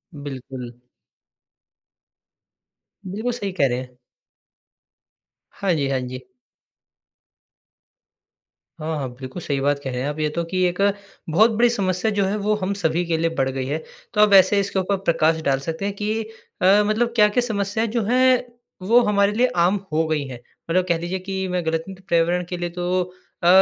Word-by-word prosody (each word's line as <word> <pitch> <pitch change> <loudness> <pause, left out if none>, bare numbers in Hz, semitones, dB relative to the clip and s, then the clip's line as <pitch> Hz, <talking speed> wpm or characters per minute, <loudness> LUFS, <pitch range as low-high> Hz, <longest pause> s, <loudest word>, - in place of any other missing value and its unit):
बिल्कुल। 130 -3 -7 2.3
बिल्कुल 215 +6 -3
सही 205 -5 -3
कह 150 -7 +2
रहे 125 -1 -1
हैं। 125 -1 -10 1.5
हाँ 195 -3 -1
जी, 145 -4 0
हाँ 135 - 0
जी। 130 0 -7 2.5
हाँ 160 +1 -2
हाँ, 135 -3 -3
बिल्कुल 130 +6 -7
सही 140 -3 -1
बात 145 +1 +1
कह 135 - -3
रहे 125 0 -3
हैं 135 - -1
आप 150 +1 -5
ये 155 0 +1
तो 170 +3 -2
कि 185 +2 -2
एक 180 +2 -2 0.5
बहुत 215 +9 +5
बड़ी 235 +2 +3
समस्या 195 -2 0
जो 205 -1 +1
है 195 +2 0
वो 210 +1 +1
हम 200 -1 -2
सभी 175 -3 0
के 165 -1 0
लिए 165 +1 +1
बढ़ 135 -1 +1
गई 130 -1 -3
है। 145 +4 -1 0.4
तो 210 - +3
अब 210 - +6
वैसे 195 +1 +6
इसके 200 -1 0
ऊपर 195 +1 0
प्रकाश 165 -3 +1
डाल 135 -1 +2
सकते 165 +7 -4
हैं 200 - -1
कि 215 +2 -1 0.4
अ, 195 +3 +6
मतलब 230 +3 +1
क्या-क्या 210 +2 +4
समस्याएँ 205 +1 -1
जो 230 0 0
हैं 255 +2 +3 0.4
वो 235 +3 +6
हमारे 200 -1 +3
लिए 240 +4 +3
आम 180 +4 +3
हो 160 +1 +2
गई 155 -2 0
हैं? 125 -2 -8 0.3
मतलब 180 +2 +2
कह 170 -2 +2
लीजिए 175 +3 -3
कि 190 0 -3
मैं 180 -2 -2
गलतंत 165 +4 -3
पर्यावरण 170 +1 +2
के 180 - -3
लिए 175 0 -3
तो 180 +1 -1 0.4
अ, - - +3
180 Hz, 180 wpm, -22 LUFS, 155-205 Hz, 2.5 s, अब